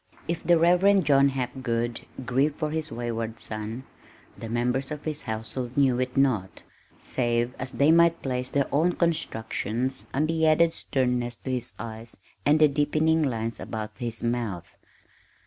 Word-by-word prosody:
If 170 0 -2
the 170 +1 +5
Reverend 180 +3 +4
John 140 -1 +5
Hapgood 125 -3 -3 0.2
grieved 135 +5 +1
for 155 -2 -2
his 160 -1 -3
wayward 115 -1 -4
son 110 +3 -5 0.5
the 115 - -8
members 125 +3 0
of 150 -1 -6
his 155 -1 -4
household 115 +3 -5
knew 130 -3 +3
it 130 +1 -2
not, 115 -9 +1 0.3
save 120 -1 -1
as 130 0 -5
they 140 +6 +4
might 170 0 +5
place 125 -1 -2
their 140 0 +1
own 165 +5 +3
constructions 130 - -2
on 145 +3 +1
the 160 0 +1
added 165 +1 +4
sternness 125 -2 -1
to 130 - -6
his 125 -2 -3
eyes 115 0 -8 0.3
and 150 +2 +5
the 155 - +7
deepening 155 +3 +2
lines 115 -5 -1
about 110 -1 -5
his 115 -2 -2
mouth. 115 -7 -3
130 Hz, 155 wpm, -26 LUFS, 120-150 Hz, 0.5 s, the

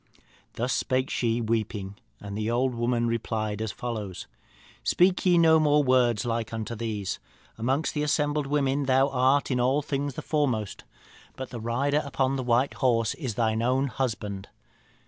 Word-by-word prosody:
"Thus 125 +3 -1
spake 130 0 0
she, 120 -1 0
weeping, 110 -3 -2 0.3
and 100 -1 -7
the 110 +1 -2
old 125 +2 +1
woman 120 0 0
replied 110 -2 -2
as 110 -1 -2
follows: 110 -6 -5 0.6
'Speak 180 +1 +3
ye 175 -1 +5
no 160 -1 +6
more 150 -1 +4
words 125 -4 +2
like 115 -1 -2
unto 115 +1 -4
these. 110 -4 -3 0.4
Amongst 130 +7 -1
the 150 - -1
assembled 150 -1 0
women 140 -1 +1
thou 135 +1 +4
art 135 +2 +2
in 125 - +1
all 130 +4 +2
things 140 -1 -2
the - - -6
foremost. 125 -10 -1 0.5
But 130 -1 -7
the 120 -3 -6
rider 135 +6 +1
upon 135 -1 0
the 135 - -2
white 125 +2 +1
horse 115 -4 +1
is 130 -9 -5
thine 110 0 +1
own 130 +3 +1
husband. 105 -7 -3
125 Hz, 165 wpm, -27 LUFS, 115-140 Hz, 0.6 s, no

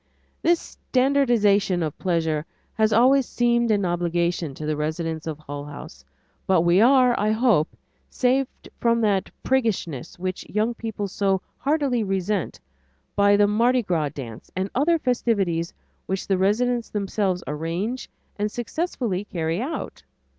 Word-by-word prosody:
This 340 0 +3
standardizing 235 -9 +2
of 155 -2 -3
pleasure 160 -4 0 0.3
has 220 0 +2
always 255 +4 +4
seemed 235 -1 +1
an 205 -3 +2
obligation 170 -3 -1
to 155 - -6
the 155 0 0
residents 160 +1 -3
of 155 -2 -3
Hull 145 -1 -7
House, 105 - -10 0.4
but 185 -3 +4
we 175 +3 +4
are, 250 0 +6
I 210 - +1
hope, 220 -8 +2 0.3
saved 260 +1 0
from 235 0 +2
that 200 -3 +1
priggishness 200 - -1
which 185 +1 -4
young 215 +3 0
people 220 -3 -4
so 195 -1 0 0.2
heartily 275 -5 +1
resent, 195 -1 -2 0.6
by 200 0 +5
the 205 - +5
Mardi 235 +4 +2
Gras 165 -6 0
dance 120 -5 -9
and 190 +1 -2
other 320 +6 +3
festivities 200 - 0 0.4
which 190 0 -2
the 195 - +1
residents 235 +5 +1
themselves 195 -2 -1
arrange 170 +11 -3 0.3
and 210 0 0
successfully 240 - -2
carry 165 0 -2
out. 295 +6 -5
200 Hz, 140 wpm, -24 LUFS, 170-240 Hz, 0.6 s, are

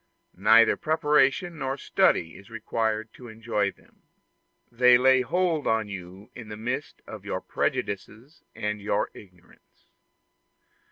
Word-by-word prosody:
Neither 110 +4 +5
preparation 155 +1 +1
nor 135 0 -2
study 80 - +1
is 100 - -14
required 110 -1 -2
to 125 - -12
enjoy 110 -2 -2
them: - - -27 0.7
they 125 +1 +6
lay 130 +1 +4
hold 165 +3 0
on 110 -2 0
you 95 +1 -10
in 115 -3 -10
the 105 - -7
midst 125 +6 -5
of - - -10
your - - -3
prejudices 110 - -4
and 105 0 -3
your 100 0 -1
ignorance. 90 -3 -19
115 Hz, 125 wpm, -26 LUFS, 105-135 Hz, 0.7 s, they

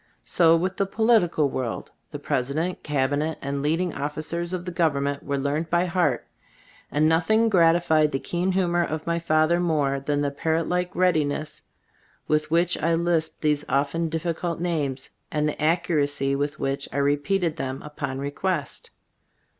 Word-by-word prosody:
So 165 -2 +4
with 185 +3 -2
the 195 - +1
political 195 -8 +3
world; 130 -4 -4 0.2
the 145 - -6
president, 145 +5 -2
cab 140 -2 0
inet 150 +3 -1
and 140 0 -3
leading 165 +3 0
officers 155 +4 -3
of 180 -1 -3
the 180 - -4
govern 160 -5 +1
ment 140 0 -2
were 140 0 -2
learned 145 +4 -1
by 175 +1 +2
heart, 170 -8 0 0.7
and 150 +1 +3
nothing 215 +8 +3
gratified 165 -4 +4
the 135 - 0
keen 175 +6 -1
humor 175 -2 +2
of 155 -1 -4
my 170 0 0
father 160 +1 +2
more 150 -5 +1
than 145 +1 -1
the 145 -1 0
parrot 160 +3 -1
like 180 0 -1
readiness 155 -4 0 0.7
with 150 0 +1
which 170 +2 +2
I 165 +1 +2
lisped 165 -1 0
these 150 -1 +1
often 145 +4 0
difficult 165 +1 -2
names, 145 -6 -2 0.2
and 150 0 0
the 150 - -1
accu 170 +3 +1
racy 140 -1 +1
with 145 +1 -2
which 135 0 -2
I - - -4
repeated 145 +5 +1
them 130 -2 -4
upon 140 -3 -5
request. 145 +2 -3
155 Hz, 165 wpm, -25 LUFS, 145-175 Hz, 0.7 s, So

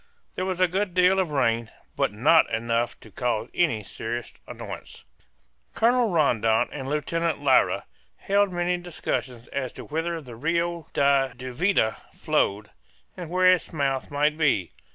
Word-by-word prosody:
There 185 - -3
was 185 -1 -2
a 185 - +5
good 185 +1 -2
deal 185 +1 +4
of 180 -5 0
rain, 115 -5 +1 0.3
but - - +1
not 140 +10 +4
enough 115 +1 -1
to 110 - -14
cause 120 -1 -2
any 150 -12 +1
serious 115 +4 -5
annoyance. - - -8 0.7
Colonel 240 0 +3
Rondon 115 - +2
and 135 -2 -5
Lieutenant 155 +1 -1
Lyra 130 -2 +3 0.3
held 200 0 +1
many 175 0 0
discussions 135 -8 -4
as 130 -3 -3
to - - -9
whither 165 +2 -2
the 125 -6 -11
Rio 170 +5 -1
da 140 -1 +3
Duvida 130 - 0 0.2
flowed, 105 +1 0 0.4
and 175 -3 -7
where 185 +1 +5
its 180 - -2
mouth 140 -4 -1
might 150 +2 +1
be. 130 - +2
150 Hz, 150 wpm, -25 LUFS, 120-175 Hz, 0.7 s, a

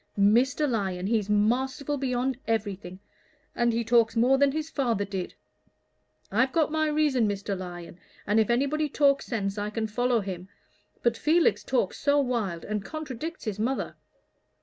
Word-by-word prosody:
"Mr. 245 +9 +3
Lyon, 190 -7 -2
he's 210 -1 0
masterful 255 +7 +1
beyond 260 -1 -1
everything, 200 -5 -3 0.5
and 240 0 +2
he 230 +1 0
talks 230 0 +3
more 245 +4 +4
than 280 -1 +4
his 310 +2 -3
father 235 -10 -1
did. 190 -2 -5 1.0
I've 250 +6 +2
got 315 -1 +1
my 315 0 +1
reason, 295 -6 +2
Mr. 200 0 -2
Lyon, 175 -2 -8 0.3
and 210 +2 +2
if 220 - +2
anybody 280 +5 +1
talks 280 -1 +2
sense 205 -4 -2
I 205 +1 -2
can 220 +1 -2
follow 245 +2 +1
him; 185 -1 -6 0.5
but 235 -1 +3
Felix 320 +6 +2
talks 245 -8 -1
so 290 0 +3
wild, 230 -11 -1
and 210 -1 -3
contradicts 310 - -6
his 210 -2 -3
mother. 255 +5 -1
235 Hz, 155 wpm, -27 LUFS, 205-275 Hz, 1.0 s, more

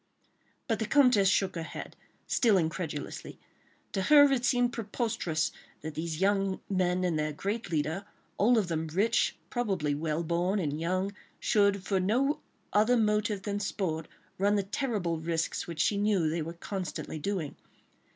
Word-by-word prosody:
But 225 -4 0
the 220 - -1
Comtesse 250 -7 +5
shook 190 -1 +2
her 165 - -4
head, 160 - -7 0.3
still 225 -5 +3
incredulously. 160 -3 -3 0.5
To 195 - -1
her 285 +6 +7
it 255 -3 +1
seemed 245 -1 +2
preposterous 205 -8 -1 0.3
that 155 0 -5
these 160 0 -3
young 195 0 +1
men 185 -1 +1
and 170 -4 +1
their 155 0 0
great 200 +8 -3
leader, 160 +4 -1 0.3
all 235 +4 +5
of 205 -5 +2
them 160 -1 -2
rich, 200 +9 +1 0.2
probably 195 - 0
well 155 +2 -1
born, 175 +4 0
and 150 -5 -1
young, 185 +3 0 0.3
should 200 -2 +2
for 195 -1 0
no 250 +10 +1 0.3
other 220 +4 +4
motive 210 -2 +1
than 205 -1 -2
sport, 175 -6 -2 0.3
run 200 +2 +3
the 200 - +1
terrible 195 - -2
risks, 165 0 -2
which 170 -2 -6
she 205 - +2
knew 200 -5 +2
they 165 +1 -1
were 165 +2 -5
constantly 170 -3 -5
doing. 175 -3 -3
190 Hz, 160 wpm, -30 LUFS, 165-210 Hz, 0.5 s, her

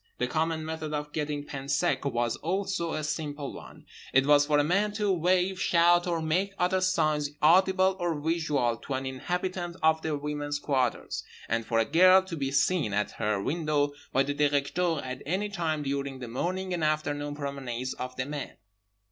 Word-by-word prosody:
The 125 - 0
common 160 +4 -1
method 160 -1 -4
of 150 0 -5
getting 150 -2 -2
pain 135 -1 -7
sec 140 -3 +1
was 120 -3 0
also 190 -1 -2
a 155 - -2
simple 150 -2 -4
one—it 135 +1 -3
was 145 0 +5
for 150 - +3
a 145 - +4
man 200 +7 +1
to 210 -2 0
wave, 185 +2 +1
shout 175 +1 +4
or 170 -2 -1
make 185 +5 0
other 185 +1 +1
signs 155 -6 +1
audible 190 +3 +4
or 170 -3 -1
visual 150 -7 0
to 135 - -5
an 130 +1 -3
inhabitant 175 +6 -3
of 160 0 +4
the 155 -2 -1
women's 145 0 -3
quarters; 130 -4 -1 0.2
and, 115 0 -1
for 115 - 0
a 115 - +3
girl, 185 +6 +6
to 190 -3 -6
be 135 -3 -2
seen 140 - +1
at 105 0 0
her 105 -2 +1
window 145 - 0 0.2
by 135 - +3
the 145 +1 -2
Directeur 145 +3 +1
at 130 0 -6
any 195 +6 -1
time 160 -6 -2
during 140 -1 -3
the 125 -2 -7
morning 185 +10 -2
and 170 -2 -2
afternoon 145 -1 -1
promenades 135 -4 -4
of 125 0 -6
the 130 - -2
men. 145 0 -6
150 Hz, 180 wpm, -28 LUFS, 140-175 Hz, 0.2 s, girl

